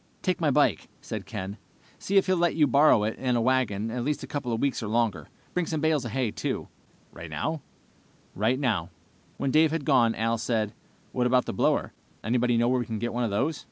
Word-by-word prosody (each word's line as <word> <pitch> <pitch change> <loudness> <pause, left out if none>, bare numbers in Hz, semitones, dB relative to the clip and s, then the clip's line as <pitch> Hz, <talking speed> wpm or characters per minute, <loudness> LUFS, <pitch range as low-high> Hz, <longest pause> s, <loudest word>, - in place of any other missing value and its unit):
"Take - - 0
my - - +3
bike," - - +2
said - - -6
Ken. 95 +3 -5 0.4
"See 200 - 0
if 195 - +5
he'll 185 - +2
let 175 -1 +1
you 155 -2 +5
borrow 140 -4 +5
it 110 +1 -2
and 125 -2 +1
a - - +2
wagon 115 -4 +1
for - - -5
at 120 - -1
least 150 +3 -2
a - - -6
couple 140 -4 -3
of 115 - -1
weeks 140 -1 0
or 110 - -4
longer. 115 -2 0 0.2
Bring 180 -2 0
some 160 - -2
bales 155 -3 +1
of 120 - -4
hay, 130 -5 0
too." - - -3 0.4
"Right 80 - -9
now?" 110 - -3 0.7
"Right 115 +6 +1
now." 105 - 0 0.5
When 135 - -1
Dave 155 +2 +5
had 160 -2 -3
gone, 120 -6 +4
Al 115 +1 0
said, 110 -3 -1 0.4
"What 125 -1 +1
about 125 0 +3
the - - -4
blower? - - +1 0.3
Anybody 120 +1 +1
know 120 +1 +3
where 125 +1 +2
we 120 - -3
can 110 - -3
get 120 +3 -3
one 120 +1 -1
of 115 - 0
those?" 135 +10 -1
125 Hz, 230 wpm, -27 LUFS, 110-145 Hz, 0.7 s, if